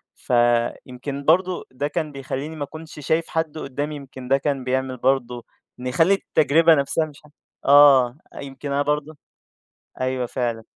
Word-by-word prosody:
فيمكن 125 +3 0
برضه 180 +3 +2
ده 140 +3 -2
كان 155 -1 -3
بيخلّيني 140 +3 -5
ما 145 -2 -4
كُنش 155 +1 -11
شايف 160 +1 +1
حد 160 -1 -2
قُدّامي، 145 +2 -4
يمكن 130 -2 -10
ده 135 +1 +4
كان 140 -2 -2
بيعمل 130 0 -2
برضه 125 -2 0 0.3
نخلّي 135 +10 +2
التجربة 165 -2 +3
نفسها 140 +3 0
مش 150 -2 -14
ح - - -17 0.4
آه، 140 -3 +6 0.2
يمكن 140 +1 -7
أنا 140 +1 +1
برضه 150 +1 -2 0.8
أيوه 130 -1 -1
فعلًا. 120 -3 -3
140 Hz, 145 wpm, -22 LUFS, 130-155 Hz, 0.8 s, آه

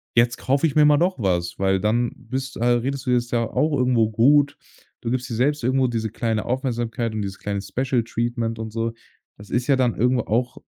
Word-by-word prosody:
„Jetzt 120 0 +3
kaufe 140 +6 +1
ich 140 - -4
mir 150 -1 +6
mal 150 0 +5
doch 180 +2 +1
was“, 90 -5 -1
weil 95 0 +1
dann 115 +4 +1
bist 130 +2 -5
äh, 115 - -3
redest 125 +3 0
du - - -2
dir 125 - +4
es 120 0 -3
ja 115 -2 0
auch 150 -1 +1
irgendwo 125 -4 +2
gut. 145 +5 +4 0.4
Du 115 - -3
gibst 125 0 -1
dir - - -4
selbst 145 +4 +1
irgendwo 130 +1 +2
diese 110 -3 -2
kleine 110 -2 -1
Aufmerksamkeit 120 -2 -2
und 110 -1 -2
dieses 95 0 -6
kleine 100 -1 -3
Special 125 +3 -1
Treatment 115 0 -2
und 110 -1 -5
so. 115 +1 -2 0.4
Das 105 0 -13
ist 120 0 0
ja 140 0 +3
dann 125 -3 +1
irgendwo 125 +2 +2
auch 120 +3 -1
120 Hz, 225 wpm, -23 LUFS, 115-130 Hz, 0.4 s, mir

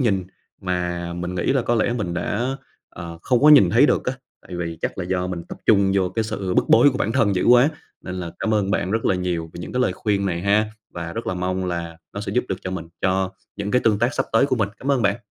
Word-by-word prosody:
nhìn 100 -7 +1 0.4
mà 90 -2 -2
mình 90 +1 -4
nghĩ 85 - -1
là 135 -3 +1
có 120 - +1
lẽ 115 +1 +1
mình 105 -8 -3
đã, 120 +9 -2 0.3
ờ, 85 -1 -8
không 125 -2 +2
có 150 - +7
nhìn 120 -13 +8
thấy 125 +7 +5
được - - +1
á. 125 - 0 0.3
Tại 90 - -7
vì 85 -2 -4
chắc - - -3
là 95 - -2
do 90 0 -1
mình 90 -2 -4
tập - - -8
trung 100 -3 +4
vô 95 -2 +2
cái 110 +4 -2
sự 100 -4 -3
bức - - +3
bối 125 +5 +6
của 130 - -4
bản 110 - 0
thân 100 -3 +2
dữ - - 0
quá, 125 +3 +6 0.3
nên 90 - -6
là 90 -2 -5
cảm 110 - 0
ơn 100 -2 +1
bạn 90 - 0
rất 110 +2 -1
là - - +3
nhiều 90 -3 -2
về - - -8
những - - -7
cái 125 - 0
lời 125 - +2
khuyên 100 +1 -1
này 85 -2 -2
ha, 105 +2 +3 0.2
và 85 -1 -6
rất 115 - -5
là 95 - -1
mong 90 +1 -2
là 85 -2 -4 0.2
nó 100 - -5
sẽ 105 - -4
giúp 125 - +1
được 95 - -1
cho 90 - -5
mình, 95 -3 -5
cho 95 0 +1 0.3
những 100 0 -3
cái 125 - +3
tương 105 -2 +3
tác 120 +3 +1
sắp - - -1
tới 115 - +4
của 130 - 0
mình. 105 -4 +1
Cảm 140 - -2
ơn 135 -4 +2
bạn! 100 0 +2
95 Hz, 280 wpm, -22 LUFS, 90-115 Hz, 0.4 s, nhìn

